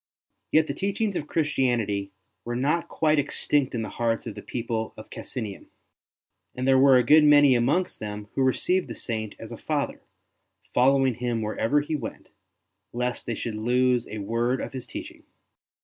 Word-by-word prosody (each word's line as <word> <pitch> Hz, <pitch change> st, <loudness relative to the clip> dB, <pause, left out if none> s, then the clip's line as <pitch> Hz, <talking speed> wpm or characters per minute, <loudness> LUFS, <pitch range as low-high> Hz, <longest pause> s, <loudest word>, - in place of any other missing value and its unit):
Yet 160 Hz, 0 st, +5 dB
the -, -, -3 dB
teachings 200 Hz, +1 st, -1 dB
of 150 Hz, -, -3 dB
Christianity 120 Hz, -10 st, 0 dB, 0.3 s
were 120 Hz, 0 st, -4 dB
not 145 Hz, +7 st, 0 dB
quite 155 Hz, -1 st, +2 dB
extinct 140 Hz, -1 st, 0 dB
in 115 Hz, -, -1 dB
the -, -, -5 dB
hearts 115 Hz, -1 st, 0 dB
of -, -, -5 dB
the 105 Hz, -, -9 dB
people 115 Hz, -1 st, -4 dB
of 110 Hz, -, -11 dB
Cassinum; 110 Hz, -7 st, -6 dB, 0.9 s
and 130 Hz, +1 st, -2 dB
there 135 Hz, -1 st, +5 dB
were 135 Hz, -1 st, +7 dB
a 125 Hz, -, +4 dB
good 150 Hz, +6 st, +6 dB
many 145 Hz, -2 st, +7 dB
amongst 140 Hz, +10 st, +1 dB
them 105 Hz, -1 st, -6 dB
who -, -, -1 dB
received 180 Hz, +8 st, +1 dB
the -, -, -7 dB
Saint 110 Hz, -3 st, -4 dB
as -, -, -10 dB
a -, -, -7 dB
father, -, -, -2 dB, 0.7 s
following 135 Hz, +1 st, +4 dB
him 120 Hz, -1 st, -2 dB
wherever 110 Hz, +6 st, +1 dB
he 150 Hz, +2 st, -3 dB
went, 150 Hz, -, -7 dB, 0.6 s
lest 125 Hz, 0 st, -3 dB
they 115 Hz, -, -1 dB
should 115 Hz, -, -4 dB
lose 125 Hz, +3 st, +1 dB
a 110 Hz, -, -6 dB
word 115 Hz, +5 st, 0 dB
of -, -, -5 dB
his 130 Hz, -2 st, -6 dB
teaching. -, -, -8 dB
125 Hz, 175 wpm, -26 LUFS, 115-145 Hz, 0.9 s, were